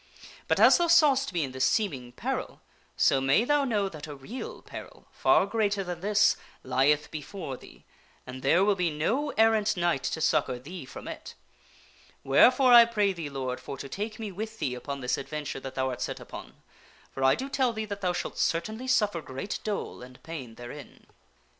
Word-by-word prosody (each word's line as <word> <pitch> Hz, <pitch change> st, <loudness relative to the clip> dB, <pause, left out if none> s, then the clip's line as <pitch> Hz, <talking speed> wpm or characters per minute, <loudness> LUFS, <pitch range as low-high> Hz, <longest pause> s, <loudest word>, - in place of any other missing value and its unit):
But, -, -, +2 dB
as -, -, +7 dB
thou 345 Hz, -, +2 dB
sawst 290 Hz, -6 st, +4 dB
me 175 Hz, -3 st, 0 dB
in 135 Hz, -, -4 dB
this 130 Hz, 0 st, -2 dB
seem 205 Hz, -, +2 dB
ing 125 Hz, -2 st, -9 dB
peril, -, -, -4 dB, 0.4 s
so 135 Hz, -, +3 dB
may 135 Hz, +11 st, +3 dB
thou 290 Hz, +1 st, +2 dB
know 210 Hz, -6 st, 0 dB
that 155 Hz, -5 st, -8 dB
a 145 Hz, -, -7 dB
real 255 Hz, -, -8 dB
peril, -, -, -10 dB
far -, -, +3 dB
greater 205 Hz, -1 st, 0 dB
than 175 Hz, -2 st, -5 dB
this, 210 Hz, +2 st, +3 dB, 0.3 s
lieth 145 Hz, +3 st, +2 dB
before 150 Hz, -1 st, -6 dB
thee, -, -, -16 dB, 0.4 s
and 130 Hz, +1 st, -8 dB
there 170 Hz, +8 st, +4 dB
will 205 Hz, -, +4 dB
be 180 Hz, -3 st, 0 dB
no 225 Hz, -, -1 dB
errant 220 Hz, -2 st, +3 dB
knight 170 Hz, -6 st, +1 dB
to 160 Hz, -, -2 dB
succor 130 Hz, -5 st, +1 dB
thee 155 Hz, +5 st, -9 dB
from -, -, -9 dB
it. -, -, -8 dB, 0.9 s
Wherefore, 250 Hz, -, +5 dB
I 235 Hz, -1 st, +10 dB
pray 210 Hz, -4 st, +1 dB
thee, 165 Hz, -5 st, -6 dB
Lord, 130 Hz, -2 st, -4 dB
for 135 Hz, -, -7 dB
to 135 Hz, -, -7 dB
take 210 Hz, +8 st, -5 dB
me 220 Hz, -3 st, -5 dB
with 220 Hz, +4 st, -6 dB
thee 130 Hz, -11 st, -2 dB
upon 140 Hz, +2 st, -6 dB
this 125 Hz, -, -1 dB
advent 150 Hz, +1 st, -5 dB
ure -, -, -7 dB
that 130 Hz, 0 st, -7 dB
thou 130 Hz, 0 st, 0 dB
art 125 Hz, -, -6 dB
set -, -, -3 dB
upon, -, -, -10 dB, 0.6 s
for 135 Hz, -, -4 dB
I 135 Hz, 0 st, +5 dB
do 265 Hz, -, -5 dB
tell 265 Hz, -2 st, +1 dB
thee 220 Hz, -1 st, -4 dB
that 200 Hz, -1 st, -6 dB
thou 180 Hz, -2 st, +1 dB
shalt 175 Hz, -, -4 dB
certainly 215 Hz, +9 st, -1 dB
suf 215 Hz, -5 st, +3 dB
fer 170 Hz, -, -5 dB
great 135 Hz, +7 st, -5 dB
dole 210 Hz, -10 st, -4 dB
and 125 Hz, 0 st, -13 dB
pain 135 Hz, -9 st, -7 dB
therein." 120 Hz, +5 st, -11 dB
175 Hz, 205 wpm, -28 LUFS, 135-220 Hz, 0.9 s, I